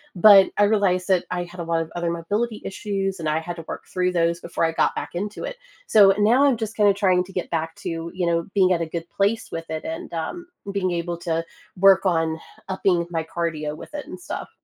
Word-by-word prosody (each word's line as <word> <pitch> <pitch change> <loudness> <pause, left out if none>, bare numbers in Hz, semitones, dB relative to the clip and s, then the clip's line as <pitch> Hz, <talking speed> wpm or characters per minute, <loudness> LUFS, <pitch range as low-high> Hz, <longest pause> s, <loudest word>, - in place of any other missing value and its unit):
but 195 +1 +8
I 205 - +5
realized 195 -4 +2
that 185 -3 +3
I 180 -1 -1
had 175 0 -9
a - - -3
lot 165 0 0
of 160 - -6
other 170 -1 -1
mobility 205 +7 -2
issues, 195 -1 -3
and 160 -2 -1
I 155 +1 +1
had 175 +2 -6
to 165 - -8
work - - -6
through 180 -1 0
those 170 0 +1
before 170 - -1
I 165 - -1
got - - +1
back - - -5
into 205 +4 -4
it. - - -5 0.3
So 200 -2 +7
now 235 +6 +4
I'm 275 -4 +4
just 220 0 -4
kinda 205 -2 +4
trying 185 -3 +2
to 190 +1 -14
get 180 - -3
back 165 -1 -2
to, 165 0 -5
you 180 -1 -1
know, 170 0 +1
being 185 -2 +4
at 170 - 0
a - - 0
good 165 +1 -6
place 205 +3 0
with 165 0 -5
it 160 0 -4
and, 165 +1 -6
um, 345 - -4 0.3
being 190 -2 -1
able 170 0 -2
to 165 -1 -1 0.3
work 195 +1 +6
on 165 -3 +1 0.3
upping 185 -2 +1
my 165 -2 -2
cardio 160 -2 -3
with - - -11
it 295 -1 -5
and 185 - -8
stuff. - - -6
180 Hz, 240 wpm, -23 LUFS, 165-200 Hz, 0.3 s, but